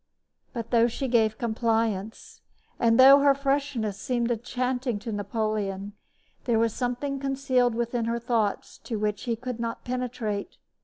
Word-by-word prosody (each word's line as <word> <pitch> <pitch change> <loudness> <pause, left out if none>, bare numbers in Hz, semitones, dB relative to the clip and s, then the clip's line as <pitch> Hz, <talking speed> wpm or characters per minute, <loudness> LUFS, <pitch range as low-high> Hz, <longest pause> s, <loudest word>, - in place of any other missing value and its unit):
But, 230 -3 -6
though 235 -1 +5
she 265 +3 -3
gave 220 -3 +2
compliance, 225 -3 -2 0.4
and 230 0 +3
though 270 +2 +9
her 280 -1 +5
freshness 275 -7 -1
seemed 240 -1 -1
enchanting 245 +1 -2
to 215 +3 -6
Napoleon, 205 -1 -2 0.5
there 235 -3 +2
was 225 -1 +2
something 265 +3 -2
concealed 265 -3 +1
within 235 0 -1
her 230 +1 -1
thoughts 230 -3 -1
to 230 - -4
which 210 +1 -2
he 235 -2 0
could 250 0 -6
not 230 0 -4
penetrate. 245 - -3
235 Hz, 145 wpm, -26 LUFS, 220-255 Hz, 0.5 s, though